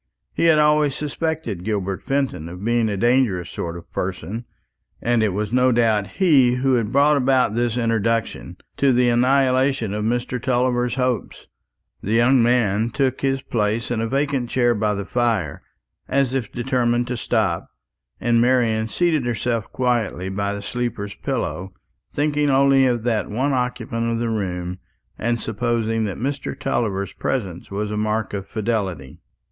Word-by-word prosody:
He - - 0
had 165 -2 +5
always 150 -2 +3
suspected 150 - -3
Gilbert 100 -3 -2
Fenton 135 - -2
of 90 +4 -8
being 120 -1 +2
a 100 - -2
dangerous 115 -6 +1
sort 85 0 -4
of 85 - -14
person, 95 +5 -4 0.5
and 120 -1 +1
it 110 - +2
was 105 +3 -3
no 125 0 +4
doubt 110 -4 +2
he 140 -10 +4
who 130 +1 +1
had 115 -3 +1
brought 145 +2 +4
about 130 -4 +2
this 120 0 0
introduction, 115 -1 -1 0.2
to 140 -2 +3
the 125 0 +3
annihilation 130 -1 +2
of 105 0 -2
Mr. 120 +2 -1
Tulliver's 125 0 +1
hopes. 125 -5 -2 0.6
This 105 - -2
young 120 +2 +5
man 115 -2 +2
took 130 +1 -1
his 135 -1 0
place 110 +1 -1
in 115 -2 0
a 115 - -1
vacant 135 -1 -1
chair 120 -1 +2
by 105 -1 0
the 100 0 -4
fire, 115 - -1 0.5
as 135 -1 +1
if 130 -6 -2
determined 120 -1 0
to 125 0 -3
stop; 105 -7 -1 0.5
while 120 0 0
Marian 115 -2 +3
seated 155 -2 +1
herself 115 -1 -2
quietly 115 -7 -1
by 100 +1 -2
the 100 - -7
sleeper's 115 -3 -3
pillow, 95 +2 -4 0.4
thinking 145 0 +1
only 135 0 +4
of 120 -3 0
that 115 -3 0
one 130 +7 0
occupant 115 -2 -2
of 115 - 0
the 115 0 -1
room, 90 -4 -3 0.4
and 120 +1 0
supposing 115 0 -1
that 100 - -4
Mr. 140 +3 -3
Tulliver's 100 -4 -1
presence 95 -9 -3
was 105 +1 -3
a 105 - -2
mark 110 -1 -1
of 100 -1 -4
fidelity. 100 - -3
120 Hz, 160 wpm, -22 LUFS, 105-130 Hz, 0.6 s, had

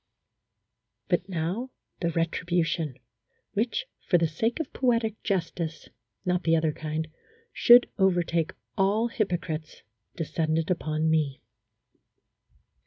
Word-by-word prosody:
But 180 +1 +1
now 185 +9 -2 0.3
the 170 - 0
retribution, 165 -2 0 0.6
which 230 - 0 0.2
for 175 - +6
the 170 - +2
sake 225 - -1
of 320 - -4
po 260 - -1
etic 230 -3 +2
justice 165 -4 -2 0.4
(not 180 0 +1
the 165 -1 +3
other 160 -1 +2
kind) 155 +1 -3 0.5
should 240 +1 +7
overtake 175 -4 +2 0.2
all 210 +5 +2
hypocrites, 175 - -3 0.3
descended 160 0 0
upon 155 -2 0
me. 155 -4 +1
170 Hz, 105 wpm, -27 LUFS, 160-200 Hz, 0.6 s, should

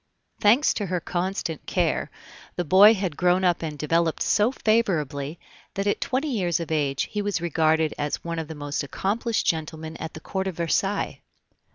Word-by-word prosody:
Thanks 235 +8 +4
to 205 - -3
her 180 0 -1
constant 175 -2 -3
care, - - 0 0.5
the 175 - -2
boy 200 +7 +7
had 185 -6 -2
grown 180 +2 +2
up 175 -2 +2
and 155 -2 -4
developed 165 +2 +1
so 215 +4 +3
favorably, 165 - 0 0.4
that 195 - -1
at 205 - 0
twenty 270 +4 -1
years 180 -7 0
of 165 -1 -5
age 145 -3 0
he 210 - -1
was 205 -4 -1
regarded 160 -1 +1
as 145 0 -2
one 170 -1 -3
of 160 - -4
the 160 - -7
most 145 0 -3
accomplished 215 - -1
gentlemen 160 0 -2
at 160 - -7
the - - -7
Court 190 +3 -3
of 185 - -4
Versailles. 190 +4 -1
170 Hz, 180 wpm, -25 LUFS, 160-200 Hz, 0.5 s, boy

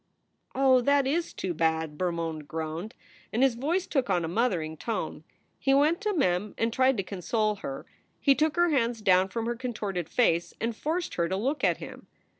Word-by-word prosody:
"Oh, 260 -1 +5
that 280 +2 +3
is 330 +5 0
too 185 - -3
bad!" 160 -1 0
Bermond 165 -3 -3
groaned, 160 +6 -5 0.4
and 240 +4 +2
his 270 -2 +4
voice 315 +10 -1
took 265 -7 -1
on 175 -3 +1
a - - -3
mothering 175 -5 0
tone. 225 +6 -4 0.4
He 270 0 +3
went 305 +6 +3
to 420 0 0
Mem 190 - 0
and 225 0 0
tried 260 0 +3
to 195 - 0
console 210 +3 -1
her. 135 -8 -6 0.3
He 280 - +5
took 305 +2 +1
her 345 0 +3
hands 235 -5 0
down 185 -1 +4
from 225 +3 -3
her 240 +1 -1
contorted 210 -8 -4
face 175 -9 +1
and 230 0 -2
forced 325 +8 -2
her 170 -1 0
to 190 - -1
look 270 +8 -1
at - - +3
him. - - -10
225 Hz, 195 wpm, -28 LUFS, 175-270 Hz, 0.4 s, Oh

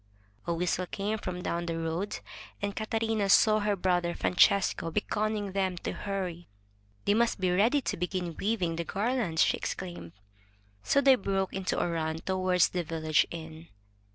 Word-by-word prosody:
A 170 - +1
whistle 180 +1 -1
came 210 +4 -2
from 180 -2 -5
down 170 0 -2
the 165 -1 -2
road, 165 +5 -3 0.4
and 200 0 -3
Catarina 220 -2 -1
saw 215 +2 +6
her 205 -1 +1
brother 175 -2 0
Francesco 180 -1 +3
beckoning 210 +2 -1
them 190 -2 -1
to - - -4
hurry. 185 -4 -4 0.6
*They 205 - +4
must 230 -1 +2
be 185 -1 +1
ready 225 +10 +3
to - - -3
begin 180 -1 -3
weaving 185 -6 -1
the 170 - -1
garlands!" 205 -3 +1
she - - +2
exclaimed. 175 - -6 0.7
So 280 - +3
they 275 -1 +7
broke 195 -5 -1
into 190 -1 -1
a - - +1
run 160 -1 -2
toward 185 +1 0
the 175 +1 +3
village 155 -2 +1
inn. 160 0 -8
185 Hz, 160 wpm, -29 LUFS, 170-205 Hz, 0.7 s, they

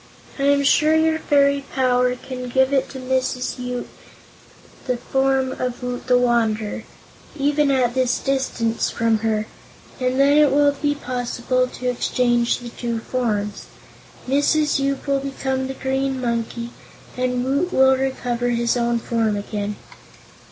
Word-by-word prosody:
I 275 - +1
am 280 0 +3
sure 305 +3 +4
your 320 0 +2
fairy 280 -2 +2
power 250 -1 +2
can 250 0 -7
give 265 +1 +3
to 270 0 0
Mrs. 255 0 -2
Yoop 250 0 -4 1.0
the 250 -1 0
form 265 +1 0
of 250 -1 -4
Woot 250 0 -4
the 250 -1 +5
Wanderer 225 -3 0 0.5
even 290 +1 +2
at 255 -3 +2
this 255 -1 +1
distance 260 -4 -1
from 230 -1 +1
her 215 -1 0 0.5
and 255 +1 0
then 285 +2 +5
it 295 -2 +5
will 290 +1 +4
be 290 +1 -1
possible 255 -1 -1
to 250 0 -6
exchange 240 -1 +1
the 245 -1 -8
two 235 0 -4
forms. 215 -4 -2 0.6
Mrs. 290 +2 +2
Yoop 275 0 -1
will 280 -1 +1
become 265 -1 -3
the 265 - -5
Green 265 0 -1
Monkey, 235 -1 -3 0.4
and 250 0 -1
Woot 285 +7 0
will 265 -3 +5
recover 245 -2 -1
his 235 0 +1
own 235 -1 +1
form 225 -2 0
again." 205 0 -4
255 Hz, 145 wpm, -21 LUFS, 240-275 Hz, 1.0 s, the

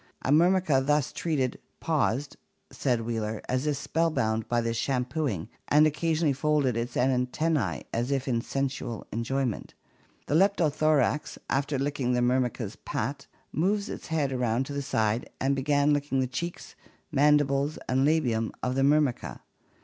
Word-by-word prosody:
A 130 - 0
Myrmica 165 -3 +4
thus 150 -1 +1
treated 140 -7 -1 0.2
'paused/ 145 -4 0 0.4
says 120 -4 0
Wheeler, 110 -2 -2
'as 130 +3 -1
if 145 -2 0
spellbound 130 -10 0
by 120 - +1
this 115 0 -1
shampooing 125 - -1 0.2
and 150 +1 +5
occasionally 155 0 +1
folded 145 -3 +1
its 120 +1 -3
antennae 130 +3 0
as 120 +3 -1
if 135 -1 -1
in 120 -3 +1
sensuous 135 -3 -3
enjoyment. 120 +1 -2 0.5
The - - -2
Leptothorax, 155 -5 +2
after 140 +1 0
licking 135 -2 -1
the 125 - +2
Myrmica's 125 0 0
pate, - - -4 0.2
moved 200 +7 0
its - - -7
head 150 -4 0
around 125 0 0
to 145 - -6
the 140 - -2
side 110 -4 0
and 135 +1 +1
began 145 +1 +2
to - - +5
lick 145 0 -1
the 130 -1 +1
cheeks, 170 +8 -5 0.4
mandibles, 145 0 +3
and 130 +1 +2
labium 125 -8 +2
of 125 - 0
the 135 - 0
Myrmica. 140 -2 +1
135 Hz, 150 wpm, -27 LUFS, 125-150 Hz, 0.5 s, and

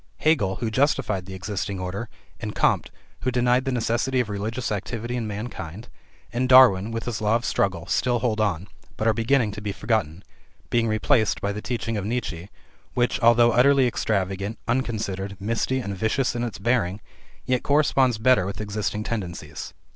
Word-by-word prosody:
Hegel, 105 -12 +2
who 110 +3 -3
justified 120 -7 +1
the 95 - -7
existing 95 +1 -4
order, 95 +5 -4 0.3
and - - -5
Comte, - - +2 0.3
who 130 - -1
denied 125 +1 +2
the 135 - 0
necessity 120 +2 0
of 120 -4 0
religious 110 +5 -3
activity 115 +4 -3
in 115 -3 -2
mankind, 105 -1 -6 0.4
and 125 +2 0
Darwin 120 -6 +7
with 115 0 -4
his 115 -3 -3
law 105 +1 +2
of 120 - -1
struggle, 90 -3 0
still 120 +5 +1
hold 115 -3 0
on, 95 -3 -1 0.3
but 110 - 0
are 110 - +4
beginning 115 0 +2
to 105 - -7
be 105 -1 -3
forgotten, 100 -5 -1 0.5
being 115 -1 +2
replaced 110 +1 +2
by 100 - -1
the 105 +1 -5
teaching 115 -2 -3
of 100 - -3
Nietzsche, 100 -6 -3 0.5
which, 120 0 +1
altho 120 0 +5
utterly 135 +2 +5
extravagant, 100 -2 -1
unconsidered, 105 -6 -2
misty, 115 +5 -1
and 100 -6 -3
vicious 110 +6 0
in 120 - -1
its 115 -6 -4
bearing, 100 -3 0 0.5
yet 125 -1 +1
corresponds 135 -4 +3
better 110 -4 +3
with 100 - -5
existing 105 0 -2
tendencies. 85 -9 -5
110 Hz, 170 wpm, -24 LUFS, 100-125 Hz, 0.5 s, Darwin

